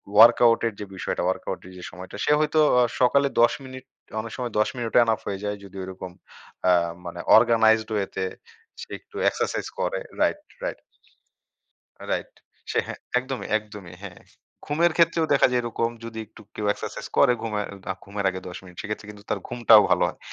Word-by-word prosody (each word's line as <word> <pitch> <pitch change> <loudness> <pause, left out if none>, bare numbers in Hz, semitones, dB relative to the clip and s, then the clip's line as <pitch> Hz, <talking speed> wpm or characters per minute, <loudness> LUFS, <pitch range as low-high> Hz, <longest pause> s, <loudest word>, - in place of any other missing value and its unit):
Workout 115 +1 +7
এর 110 - -3
যে, 105 - -5
বিষয়টা, 90 - -3
ওয়ার্কআউট 95 - -2
এর - - -12
যে, 90 - -10
সময়টা, 90 +2 -10
সে 150 - +2
হয়তো 155 +1 +2 0.2
অ - - +6 0.2
সকালে 140 +3 +4
১০ 120 - +5
মিনিট 130 0 -10 0.4
অনেক 110 0 -8
সময় 120 -2 -3
১০ 105 - +3
মিনিটও 120 0 +2
এনাফ 115 -1 +1
হয়ে 100 0 -3
যায়, 105 0 -2
যদি 95 0 -12
ওরকম 95 -1 -7 0.6
আ - - +6 0.3
মানে 85 0 -7 0.2
অর্গানাইজড 110 -1 +4
ওয়ে 100 -2 +1
তে 95 - -1 0.6
সে - - -9
একটু 420 - -23
এক্সারসাইজ - - -2
করে - - -1 0.2
রাইট, - - +2 0.2
রাইট - - -3 1.3
রাইট। - - -2 0.4
সে - - 0
হ্যাঁ, - - -7 0.2
একদমই, 130 +1 -5
একদমই। 105 -5 -11
হ্যাঁ। 95 -3 -9 0.5
ঘুমের 165 +3 +2
ক্ষেত্রেও 165 -1 +3
দেখা 140 - +5
যায়, 125 -1 +2
এরকম 115 0 -1
যদি 115 -1 -7
একটু 110 - -17
কেউ 105 - -3
এক্সারসাইজ - - -7
করে, 125 - +6
ঘুমে 105 -2 -2 0.3
আ - - -10
ঘুমের 100 0 -5
আগে 95 0 -6
১০ 90 - -8
মিনিট, 90 -2 -14
সেক্ষেত্রে 105 -1 -5
কিন্তু 100 -1 -13
তার 105 - +1
ঘুমটাও 115 -3 +6
ভালো - - +3
হয়। - - -9
110 Hz, 185 wpm, -25 LUFS, 100-125 Hz, 1.3 s, ওয়ার্কআউট